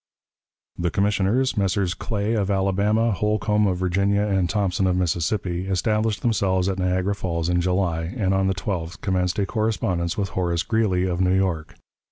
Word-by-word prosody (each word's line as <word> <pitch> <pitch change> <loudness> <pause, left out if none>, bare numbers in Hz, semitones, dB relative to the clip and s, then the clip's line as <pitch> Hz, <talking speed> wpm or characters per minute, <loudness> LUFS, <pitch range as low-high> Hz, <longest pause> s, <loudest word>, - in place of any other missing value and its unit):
The 85 0 +1
commissioners 105 - +1
Messrs. 95 -2 0
Clay, 105 +2 -2
of 105 -3 0
Alabama; 100 +4 +1
Holcombe, 105 0 +1
of 90 -2 0
Virginia; 100 +3 +1
and 95 -4 +1
Thompson, 95 -2 0
of 90 - +1
Mississippi 90 +1 -1
established 105 +3 0
themselves 95 -5 +1
at 95 -1 -1
Niagara 90 +2 0
Falls 85 -4 -2
in 90 0 +2
July, 85 -2 0
and 95 -3 +1
on 95 0 +2
the 95 - 0
12th 90 -2 -4
commenced 90 -2 0
a 100 - +1
correspondence 95 -6 -1
with 100 -2 -1
Horace 85 -3 -1
Greeley, 105 -5 +1
of 90 -1 -1
New 90 0 +3
York. 90 -5 -1
95 Hz, 165 wpm, -23 LUFS, 90-105 Hz, -, New